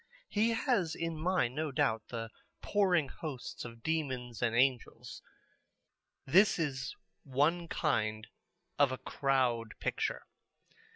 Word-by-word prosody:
He 215 +2 +2
has 225 - +1
in 165 -1 -3
mind, 155 -6 +1
no 155 +1 -2
doubt, 120 -6 +1
the 115 -2 -5 0.3
pouring 180 -7 +3
hosts 140 -6 -6
of 115 -1 -10
demons 130 -7 -2
and 115 -1 +1
angels. 125 -1 0 1.0
This 190 +9 +5
is 140 -5 -2 0.3
one 150 +6 +1
kind 110 -10 0 0.5
of 140 -2 +5
a 130 - -3
Crowd 125 -6 0
Picture. - - -2
140 Hz, 115 wpm, -33 LUFS, 120-165 Hz, 1.0 s, This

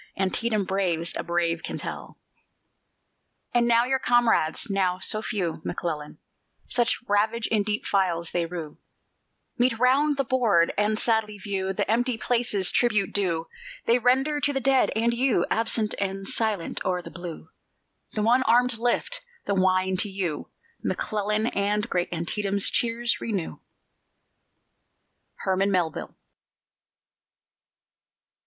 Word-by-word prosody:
Antietam 205 +3 0
braves 180 -4 -1
a - - -2
brave 170 -1 0
can - - -5
tell. - - -7 1.4
And 240 -1 +3
when 235 +1 +4
your 265 0 +1
comrades 240 -8 +2
(now 190 -3 +1
so 215 +3 0
few, 180 -7 -3
McClellan, 150 -4 -4 0.5
Such 240 0 +1
ravage 220 +3 +1
in 215 -2 +1
deep 210 +1 -2
files 175 -4 0
they 170 -1 0
rue) 165 -3 -7 0.8
Meet 245 -1 +3
round 275 +4 +3
the 275 - +2
board, 225 -10 +2
and 210 +1 +1
sadly 220 -2 0
view 190 -1 -2
The 195 - -2
empty 240 +2 +1
places; 225 -6 0
tribute 215 -5 +1
due 170 -5 0 0.4
They 235 +2 +4
render 265 +5 +2
to 285 - +2
the 270 - 0
dead 270 0 +3
and 230 +2 +2
you! 235 -7 +2
Absent 225 -1 +1
and 195 0 -3
silent 215 -6 -1
o'er 180 -1 -1
the - - -9
blue; 175 -2 -8 0.6
The 210 - -1
one 240 +4 +4
armed 240 0 +3
lift 245 - 0 0.2
the - - 0
wine 185 0 +2
to 205 - -1
you, 185 -6 -3 0.3
McClellan, 210 0 -1
And 210 -1 0
great 175 -1 -1
Antietam's 195 +4 -1
cheers 235 0 0
renew. 200 -7 -3 1.8
HERMAN 190 +1 +1
MELVILLE. 175 -5 -1
210 Hz, 130 wpm, -26 LUFS, 185-235 Hz, 1.8 s, when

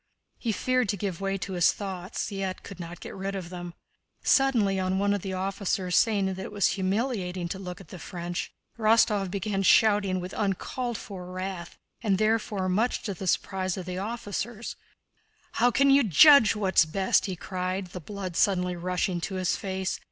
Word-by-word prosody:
He 230 - -1
feared 255 +1 +1
to 205 - 0
give 190 -2 -4
way 195 0 -1
to 195 0 -5
his 175 -1 +4
thoughts, 190 +1 -5
yet 195 -2 -4
could 195 -2 -10
not 170 0 -7
get - - -8
rid 195 +1 -4
of 180 -2 -6
them. 175 -1 -7 0.5
Suddenly, 230 -8 +3
on 185 0 0
one 200 +1 +2
of 205 - -1
the 190 0 -4
officers' 190 -1 -1
saying 210 -3 +3
that 190 0 -3
it 190 - -6
was 205 -1 +2
humiliating 190 -3 -1
to 190 - -4
look 180 0 -7
at 185 -5 -14
the 185 - -9
French, 175 +1 -5 0.3
Rostóv 215 -3 +3
began 195 +1 -2
shouting 200 -2 +4
with 180 +1 -6
uncalled 220 +4 -2
for 180 -3 -8
wrath, 185 -1 -5 0.2
and 205 -4 +2
therefore 215 -2 0
much 215 +7 0
to 205 - -3
the 190 +1 -6
surprise 185 +1 0
of 185 - -5
the 180 0 -4
officers: 220 +1 -4 0.8
"How 245 +2 +3
can 275 +3 +4
you 275 +1 +6
judge 225 - +7
what's 190 -5 +3
best?" 190 +6 +1
he 190 - -3
cried, 185 +1 -4
the 180 - -6
blood 185 0 -6
suddenly 180 -3 +2
rushing 180 0 -1
to 190 - -3
his 185 -1 0
face. 190 -1 -3
195 Hz, 185 wpm, -27 LUFS, 185-210 Hz, 0.8 s, judge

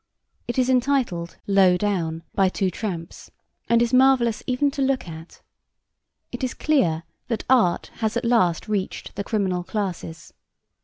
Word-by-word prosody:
It 240 - -3
is 255 -1 +3
entitled 250 -10 0
Low 190 -3 +4
Down, 170 -5 -2
by 195 -1 +3
Two 190 0 -1
Tramps, 175 -4 -6 0.4
and 235 0 +4
is 240 +1 -2
marvellous 255 -3 +4
even 270 +3 +1
to 280 0 -4
look 265 -5 0
at. 160 0 -11 0.9
It - - -6
is 255 - -2
clear 175 - +1 0.2
that 230 -4 -3
art 235 -10 +2
has 220 0 -1
at 240 - -2
last 225 -7 +2
reached 205 -3 -3
the 200 - -3
criminal 190 -5 -1
classes. 180 -5 -5
210 Hz, 150 wpm, -23 LUFS, 180-250 Hz, 0.9 s, Low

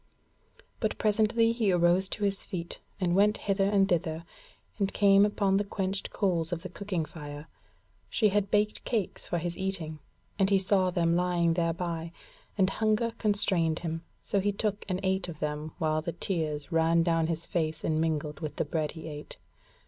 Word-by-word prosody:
But - - -1
presently 220 +2 +3
he 230 -4 +1
arose 175 +2 +3
to 210 - -5
his 200 -1 +1
feet 170 -2 -5 0.2
and 180 -3 +1
went 205 +2 +4
hither 195 -1 +1
and 200 -2 +4
thither, 165 -2 -1 0.5
and 195 -1 +1
came 200 0 +5
upon 200 -2 +1
the 205 - +1
quenched 195 -1 -3
coals 175 -5 0
of 170 -1 -3
the 185 - -5
cooking 180 -3 -3
fire: 150 -1 -9 0.6
she 215 - +3
had 200 0 +1
baked 210 +1 +1
cakes 215 -6 -2
for 175 - -1
his 170 +1 -3
eating, 175 -5 -4 0.4
and 195 -1 +4
he 200 - +5
saw 190 -1 +3
them 170 -2 +1
lying 175 -1 +2
thereby, 165 -1 -2 0.5
and 190 -1 +3
hunger 220 +1 +1
constrained 185 -6 +1
him, 165 -1 -4 0.2
so 200 - +1
he 205 +2 +1
took 205 0 -2
and 185 0 0
ate 190 -1 0
of 160 - -7
them 150 +1 -3
while 155 0 +1
the 165 +1 -4
tears 155 -5 -2
ran 165 0 +3
down 165 -1 +2
his 165 0 -3
face 155 -2 -2
and 155 0 +1
mingled 155 -2 -1
with 155 -3 -5
the - - -1
bread 155 0 -2
he 160 -1 -8
ate. 150 -1 -8
180 Hz, 180 wpm, -29 LUFS, 165-200 Hz, 0.6 s, came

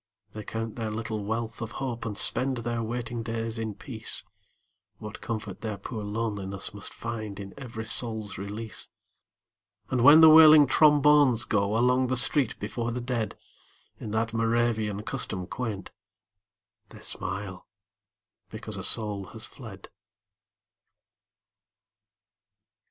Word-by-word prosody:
They 110 - -6
count 115 +2 -5
their 110 -2 -2
little 110 -1 -4
wealth 115 +2 -3
of 115 -1 -5
hope 120 -4 -4
And 105 -2 -5
spend 130 0 +2
their 120 0 -2
waiting 120 +1 -4
days 115 0 -3
in 110 -2 -4
peace, - - -4 0.7
What 105 0 -9
comfort 105 -4 -5
their 110 -3 -4
poor 105 +2 -6
loneliness 105 -3 -4
Must 100 -1 -6
find 110 -4 -6
in 100 -1 -8
every 115 -5 -7
soul's 110 -2 -1
release! 105 +3 -5 1.0
And 130 -2 +1
when 145 +5 +9
the 160 - +10
wailing 155 -1 +9
trombones 145 -4 +5
go 100 +1 +1
Along 125 +2 +3
the 130 0 -1
street 130 -1 +3
before 115 +3 -3
the 125 - -3
dead 120 -3 -3 0.6
In - - -6
that 110 +1 -1
Moravian 115 -2 0
custom 100 -8 -4
quaint, 110 -2 -5 1.0
They - - -13
smile 95 -1 -5 0.8
because 110 -1 -5
a 95 - -5
soul 105 -3 +1
has 110 +4 -8
fled. 110 -7 -11
115 Hz, 130 wpm, -27 LUFS, 105-120 Hz, 1.0 s, the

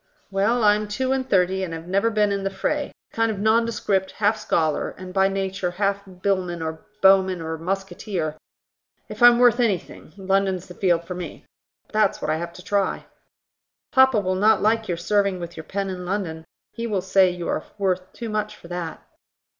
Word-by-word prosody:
"Well, 215 +5 +2
I'm 210 0 +4
two 255 +6 -1
and 265 -1 -1
thirty, 190 0 +2
and 165 -3 -4
have 165 +1 -9
never 195 +5 +2
been 210 -2 +2
in 200 -1 -1
the 195 - 0
fray: 280 +10 -2 0.2
a - - -21
kind 225 0 +2
of 215 - -2
nondescript, 215 -3 +1
half 210 +1 +2
scholar, 160 -7 0
and 185 0 -9
by 190 0 +4
nature 195 -1 -2
half 200 +2 -1 0.2
billman 185 -3 0
or 160 +2 -5 0.2
bowman 190 -1 +5
or 160 0 -4
musketeer; 180 -2 -3 0.7
if - - -9
I'm 240 0 +8
worth 245 0 +5
anything, 200 -9 -1
London's 190 -1 0
the 180 - -11
field 175 -2 +1
for 180 - -5
me. 180 -1 -7 0.4
But - - -28
that's 215 0 +2
what - - -1
I 155 - +1
have 170 +1 -5
to 180 - -12
try." 200 0 0 0.9
"Papa 265 -5 +5
will 185 -2 -1
not 210 +3 +4
like 220 +1 +2
your 175 - -1
serving 200 +1 +1
with 170 0 -7
your 160 - -8
pen 200 0 -3
in 185 -1 -5
London: 175 -4 -3 0.3
he 235 0 -4
will 200 -4 0
say 190 0 +4
you 175 -1 -5
are - - -1
worth 185 -2 -1
too 230 -2 -6
much 210 0 -2
for 170 - -15
that." 175 -2 -5
195 Hz, 195 wpm, -23 LUFS, 180-210 Hz, 0.9 s, I'm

